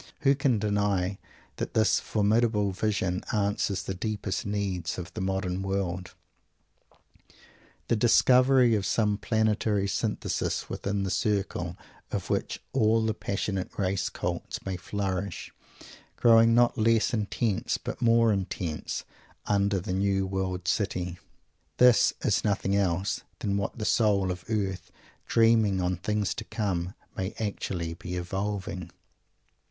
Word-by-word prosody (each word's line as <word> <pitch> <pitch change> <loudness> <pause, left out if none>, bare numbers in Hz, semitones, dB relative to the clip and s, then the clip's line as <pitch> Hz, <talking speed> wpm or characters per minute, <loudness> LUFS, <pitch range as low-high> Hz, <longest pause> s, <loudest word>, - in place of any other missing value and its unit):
Who 135 -1 +5
can 135 -4 +1
deny 100 -2 0 0.4
that - - -4
this 110 -1 +4
formidable 105 -1 +1
vision 95 -2 -1
answers 100 -1 0
the 95 - -3
deepest 105 0 -3
need 100 -4 -2
of 90 -2 -7
the - - -4
modern 95 -1 -1
world? 95 -2 -3 1.7
The - - +2
discovery 125 +2 +5
of 105 -3 +1
some 105 0 +1
Planetary 105 -2 +1
Synthesis - - -2
within 100 0 -2
the 95 - -2
circle 95 -5 -1 0.3
of - - -3
which - - -1
all 110 +1 +3
the 110 - +1
passionate 100 -2 -3
race 95 -1 0
cults - - -4
may 95 -1 -2
flourish; 95 0 -4 0.6
growing 115 0 +6
not 120 -1 +3
less 115 +1 +3
intense 105 -1 0
but - - -6
more 115 -2 +4
intense, 90 -4 -3 0.4
under 100 -1 +2
the 90 +1 -4
new 95 0 +1
World 95 -1 -3
City 90 -5 -1 0.6
this 125 -2 +6
is - - +1
nothing 100 -1 0
else 95 -1 0 0.2
than 100 -1 -1
what 100 +2 -2
the 110 - -3
soul 100 -5 +2
of 90 0 -7
the 110 -3 0
earth, 90 -2 -7 0.4
"dreaming 115 -4 +4
on 90 0 0
things 105 +1 -1
to 120 - -6
come" 95 -5 -2 0.2
may 95 +1 -3
actually 95 -5 -3
be 90 +2 -6
evolving. 95 0 -3
100 Hz, 130 wpm, -28 LUFS, 95-110 Hz, 1.7 s, growing